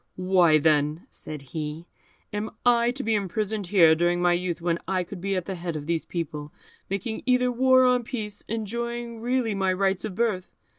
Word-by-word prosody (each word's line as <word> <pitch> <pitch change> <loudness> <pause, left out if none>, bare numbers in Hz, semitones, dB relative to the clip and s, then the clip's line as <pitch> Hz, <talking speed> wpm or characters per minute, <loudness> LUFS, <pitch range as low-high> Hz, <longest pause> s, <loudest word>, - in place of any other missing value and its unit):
"Why, 180 -4 +4
then," 150 +3 +2
said 150 -2 -9
he, 155 +1 -4 0.5
"am 210 +1 -2 0.2
I 235 -1 +4
to 265 +3 -3
be 225 - +1
imprisoned 205 0 -1
here 170 -4 +6
during 175 +2 +1
my 175 0 +3
youth, 175 -1 -2
when 170 0 0
I 185 -1 0
could 180 0 -9
be 195 +1 -1
at 185 -2 -2
the 195 - -4
head 170 -2 -4
of 150 -1 -5
these 165 0 -1
people, 150 -3 -5 0.4
making 200 +3 -3
either 250 0 +3
war 260 +1 +5
or 250 0 +4
peace, 220 -4 -5
enjoying 235 +1 -4
really 245 -2 0
my 190 -1 +1
rights 190 0 0
of 215 -4 -4
birth? 210 -6 -1
195 Hz, 190 wpm, -26 LUFS, 170-230 Hz, 0.5 s, here